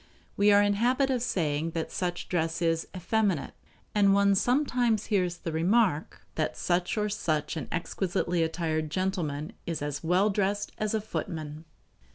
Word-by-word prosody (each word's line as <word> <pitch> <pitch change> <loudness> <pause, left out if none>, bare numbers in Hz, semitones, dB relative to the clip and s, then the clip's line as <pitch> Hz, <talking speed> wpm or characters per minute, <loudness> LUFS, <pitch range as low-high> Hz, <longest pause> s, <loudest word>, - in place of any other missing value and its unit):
We 205 +1 +4
are 205 0 +6
in 205 - +3
the 200 - -1
habit 260 +3 +2
of 250 -2 0
saying 160 -7 -1
that 160 - -3
such 175 -1 -3
dress 165 -2 -1
is 165 -1 0
"effeminate"; 190 -3 0 0.4
and 200 -2 +4
one 200 0 +4
sometimes 245 -1 +2
hears 180 -3 +1
the 165 - -5
remark 175 0 +1
that 155 - -2
such 175 +3 0
or 210 0 +1
such 155 -7 -1
an 160 - -4
exquisitely 175 0 -1
attired 160 -1 -1
gentleman 160 -4 -2
is 165 -3 -2
as 145 +1 -4
well 185 +5 +3
dressed 205 +1 -1
as 215 0 0
a 220 - 0
footman. 160 -6 -5
180 Hz, 165 wpm, -28 LUFS, 160-205 Hz, 0.4 s, are